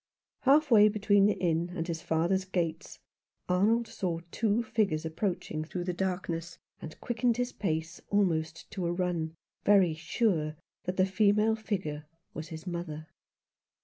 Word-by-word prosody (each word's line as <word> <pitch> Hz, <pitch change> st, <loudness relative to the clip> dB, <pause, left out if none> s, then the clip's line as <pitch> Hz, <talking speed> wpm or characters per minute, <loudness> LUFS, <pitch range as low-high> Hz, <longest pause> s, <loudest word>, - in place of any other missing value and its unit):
Half 285 Hz, +2 st, +4 dB
way 210 Hz, -2 st, +8 dB
between 205 Hz, -1 st, +4 dB
the 210 Hz, -, +1 dB
inn 170 Hz, -1 st, 0 dB
and 165 Hz, -2 st, -3 dB
his 165 Hz, -2 st, -3 dB
father's 170 Hz, +4 st, +1 dB
gates 175 Hz, -3 st, -3 dB, 0.5 s
Arnold 215 Hz, +6 st, +2 dB
saw 170 Hz, -3 st, -3 dB
two 220 Hz, +1 st, +1 dB
figures 195 Hz, -9 st, 0 dB
approaching 160 Hz, -2 st, -2 dB
through 175 Hz, +3 st, -4 dB
the 180 Hz, 0 st, -2 dB
darkness, 170 Hz, -2 st, -3 dB, 0.2 s
and 155 Hz, -, -9 dB
quickened 240 Hz, 0 st, +1 dB
his 245 Hz, 0 st, -1 dB
pace 165 Hz, -2 st, -3 dB
almost 165 Hz, -5 st, 0 dB
to 185 Hz, -4 st, -2 dB
a -, -, 0 dB
run, 175 Hz, -3 st, -1 dB, 0.3 s
very 195 Hz, -5 st, +5 dB
sure 155 Hz, -1 st, 0 dB, 0.3 s
that 180 Hz, +1 st, -3 dB
the 185 Hz, -, +5 dB
female 210 Hz, +3 st, +3 dB
figure 180 Hz, -9 st, -4 dB, 0.3 s
was 160 Hz, +1 st, -6 dB
his 160 Hz, +1 st, -8 dB
mother. 170 Hz, -3 st, -5 dB
180 Hz, 145 wpm, -30 LUFS, 165-205 Hz, 0.5 s, way